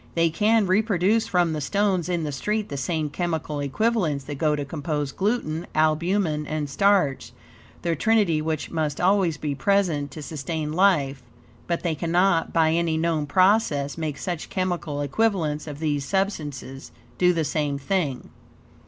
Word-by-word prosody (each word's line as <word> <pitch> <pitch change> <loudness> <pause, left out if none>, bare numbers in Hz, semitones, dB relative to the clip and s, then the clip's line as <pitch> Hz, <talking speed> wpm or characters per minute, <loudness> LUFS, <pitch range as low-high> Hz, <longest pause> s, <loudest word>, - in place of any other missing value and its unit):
They 165 -1 +3
can 215 +5 +3
reproduce 205 +2 +2
from 175 -3 +2
the 155 - -3
stones 190 +1 0
in 175 -2 0
the 150 - -2
street 210 +9 -2
the 140 - -5
same 150 +2 -2
chemical 160 -3 -2
equivalents 155 - 0
that 140 0 -7
go 155 -2 +2
to 145 -1 -3
compose 145 -1 -3
gluten, 185 - -1
albumen, 155 0 +1
and 155 -1 -2
starch 185 -2 +2 0.5
the 170 -1 0
trinity 200 -5 +2
which 155 -1 -3
must 155 -3 -2
always 185 -3 +2
be 150 -1 -2
present 160 -2 +1
to 150 +2 -9
sustain 155 +1 -4
life; 155 -8 +2 0.5
but 170 -1 -1
they 170 -2 0
cannot, 170 +2 +1
by 160 -1 +3
any 165 -1 +1
known 160 -2 0
process, 185 -5 +2
make 155 -3 -3
such 175 -1 -4
chemical 175 -6 -2
equivalents 155 -2 0
of 145 -2 -6
these 145 -2 -1
substances, 145 -7 -3 0.3
do 180 0 +5
the 165 -3 0
same 145 -1 -1
thing. 145 -3 -2
160 Hz, 155 wpm, -24 LUFS, 150-185 Hz, 0.5 s, do